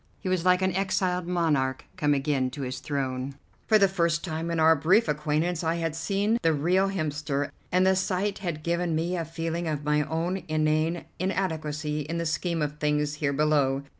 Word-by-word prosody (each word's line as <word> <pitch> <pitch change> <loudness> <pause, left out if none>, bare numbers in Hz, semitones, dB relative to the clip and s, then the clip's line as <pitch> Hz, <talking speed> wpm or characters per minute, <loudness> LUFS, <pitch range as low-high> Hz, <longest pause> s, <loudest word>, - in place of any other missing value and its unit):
He 195 - -6
was 185 -2 +1
like 180 +1 +4
an 190 -1 +1
exiled 185 -2 0
monarch 150 -7 0
come 145 -1 +2
again 135 -2 0
to 140 - -3
his 130 0 -4
throne; 135 -1 -3 0.3
for 215 - +6
the 200 -2 +5
first 170 -4 0
time 165 0 -3
in 170 -1 -1
our 160 +1 +6
brief 180 +9 +3
acquaintance 155 +3 0
I 165 +1 +1
had 165 -2 -2
seen 200 +7 0
the 165 -1 +3
real 180 +6 +2
Hemster, 150 -5 -2 0.2
and 185 +1 +3
the 190 0 +4
sight 190 +1 -1
had 170 -5 -4
given 170 0 0
me 170 +3 -1
a 170 - -1
feeling 165 +1 -3
of 150 -2 -2
my 150 0 +2
own 165 +5 -2
inane 155 +2 +1
inadequacy 155 -5 -2
in 155 +3 -3
the 170 - -2
scheme 165 +1 -1
of 150 0 -4
things 150 -1 +1
here 140 -2 +2
below. 140 -2 +2
160 Hz, 195 wpm, -27 LUFS, 150-180 Hz, 0.3 s, for